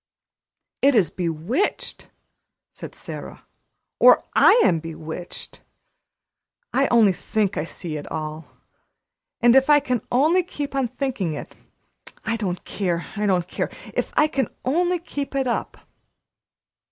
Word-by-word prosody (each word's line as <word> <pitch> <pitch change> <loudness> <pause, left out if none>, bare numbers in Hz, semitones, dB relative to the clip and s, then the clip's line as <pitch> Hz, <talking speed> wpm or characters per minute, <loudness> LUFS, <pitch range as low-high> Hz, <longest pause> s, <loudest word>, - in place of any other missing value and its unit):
"It 280 -1 +5
is 200 -7 +3
bewitched!" 180 - -2 0.6
said - - -10
Sara. - - -8 0.5
"Or - - +7
I 485 - +6
am 165 -3 +3
bewitched. 160 +1 -7 1.1
I 270 +2 +3
only 220 -5 +5
think 205 +2 -1
I 150 - -1
see 165 -2 -6
it 145 - -8
all; 155 0 -5 0.9
but 240 +1 +6
if 270 +2 +5
I 295 0 +7
can 255 -5 -1
only 310 +9 +4
keep 295 -5 -6
on 270 -2 +1
thinking 250 - -2
it, - - -8 0.7
I 225 +1 0
don't 185 -5 -3
care 175 -4 -2
I 210 0 0
don't 180 -3 +1
care - - -3 0.2
if - - -2
I 300 - +6
can 270 -6 -1 0.2
only 350 +7 +2
keep 290 -5 -6
it 270 -1 +1
up!" 240 - -2
230 Hz, 135 wpm, -23 LUFS, 175-275 Hz, 1.1 s, Or